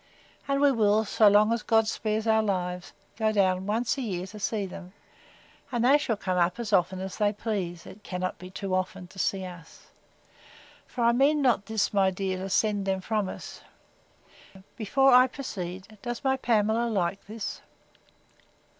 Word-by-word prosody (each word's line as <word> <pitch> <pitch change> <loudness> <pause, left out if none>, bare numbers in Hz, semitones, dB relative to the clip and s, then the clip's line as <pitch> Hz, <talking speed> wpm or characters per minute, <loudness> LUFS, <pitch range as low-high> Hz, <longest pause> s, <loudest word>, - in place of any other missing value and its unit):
And 275 0 +1
we 285 -1 +5
will, 215 -2 +2
so 215 +1 +4
long 210 +2 +5
as 230 - -1
God 225 -1 +2
spares 215 0 -2
our 220 -1 +4
lives, 180 -3 -2 0.3
go 220 -1 +1
down, 190 -2 +1
once 230 +5 0
a - - -2
year, 185 -7 -3
to 210 +3 -10
see 205 0 -1
them; 185 0 -10 0.8
and 240 -1 0
they 280 +3 +6
shall 225 -6 -1
come 185 -2 -1
up, 175 +5 +1
as 220 -3 -4
often 185 0 +2
as 190 0 -6
they 205 -1 +3
please, 195 -5 -4
it 210 - -12
cannot 185 -1 -4
be 180 - -9
too 190 0 -5
often, 185 0 -2
to 190 - -12
see 190 0 -1
us: 175 -3 -12 1.0
for 245 - -3
I 235 - +5
mean 275 +5 +3
not 235 -6 +2
this, 220 -2 0
my 195 -2 +4
dear, 190 0 -3
to 190 +1 -5
send 205 0 +1
them 190 0 0
from 210 0 -1
us.—Before 220 +11 -4
I 250 +1 +7
proceed, 195 -6 -7
does 240 +2 -5
my 265 -1 +2
Pamela 230 -2 +1
like 195 -2 -2
this? 215 0 -6
205 Hz, 175 wpm, -27 LUFS, 190-225 Hz, 1.0 s, I